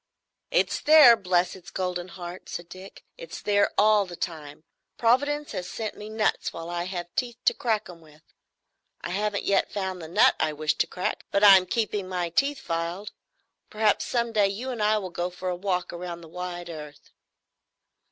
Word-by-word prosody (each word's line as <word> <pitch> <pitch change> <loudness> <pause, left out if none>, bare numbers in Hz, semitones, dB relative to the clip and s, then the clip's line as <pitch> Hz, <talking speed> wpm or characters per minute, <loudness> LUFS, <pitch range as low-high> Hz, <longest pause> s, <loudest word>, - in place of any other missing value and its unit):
"It's - - +1
there, 300 -6 +8
bless 180 -3 0
its 185 - -12
golden 180 -1 -3
heart," 175 0 -9
said 175 0 -6
Dick. 190 +1 -12
"It's - - -8
there 205 -1 +2
all 210 -1 +4
the 175 - -8
time. 155 -4 -6 0.3
Providence 285 +5 +1
has 180 0 -5
sent 220 -2 -5
me 210 +1 -9
nuts 220 0 0
while 165 +1 -7
I 175 0 -2
have 175 -2 -6
teeth 240 -2 -2
to - - +5
crack 230 -6 -1
'em 170 -2 -12
with. 155 -1 -20 0.8
I - - -5
haven't 205 +1 -1
yet 200 - +1
found 190 -3 -3
the 160 - -7
nut 170 - +4
I 155 - +1
wish 155 0 0
to - - +2
crack, 180 - -3
but 200 - +1
I'm 190 -2 +8
keeping 210 -3 -2
my 180 -2 -2
teeth 275 - 0
filed. 170 +4 -3 0.6
Perhaps 215 -1 +1
some 235 -1 0
day 210 -3 +3
you 230 +7 -4
and 235 -3 -4
I 215 +1 +3
will 190 -4 -5
go 175 +1 -2
for 180 +1 -5
a 180 - -1
walk 180 -1 -2
round 175 -1 -7
the - - -11
wide 175 0 -6
earth." 150 -2 -11
185 Hz, 190 wpm, -26 LUFS, 175-215 Hz, 0.8 s, there